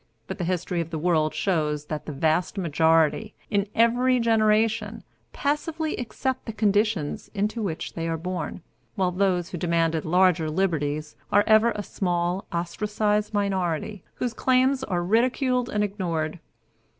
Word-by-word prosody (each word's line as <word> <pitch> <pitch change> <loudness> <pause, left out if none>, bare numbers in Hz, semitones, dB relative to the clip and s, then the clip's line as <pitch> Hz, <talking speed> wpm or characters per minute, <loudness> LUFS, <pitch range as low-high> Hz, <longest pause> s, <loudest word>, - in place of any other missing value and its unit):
But - - -7
the 175 - -1
history 180 0 -1
of 165 - -5
the 165 - -4
world 155 -1 +2
shows 150 -6 0
that 150 0 -5
the - - -3
vast 160 +7 0
majority, 165 +4 +2 0.2
in 200 0 +1
every 245 +2 +3
generation, 220 -1 +2 0.3
passively 310 +2 -2
accept 260 +2 -3
the 225 - -4
conditions 205 -6 0
into 210 +3 -1
which 175 -7 -4
they 165 0 -3
are 165 0 -1
born, 180 0 -5 0.3
while 185 -2 +1
those 180 -2 0
who 175 - -6
demanded 165 -2 +1
larger 175 -1 +3
liberties 155 -4 -1 0.2
are 205 - +5
ever 220 +1 +5
a 205 - -3
small, 175 0 -1
ostracized 210 +4 -1
minority, 190 -1 -1
whose 245 -2 -2
claims 260 +2 +2
are 175 -2 -1
ridiculed 250 +4 +1
and 210 -3 0
ignored. 175 -6 -2
190 Hz, 145 wpm, -25 LUFS, 165-220 Hz, 0.3 s, are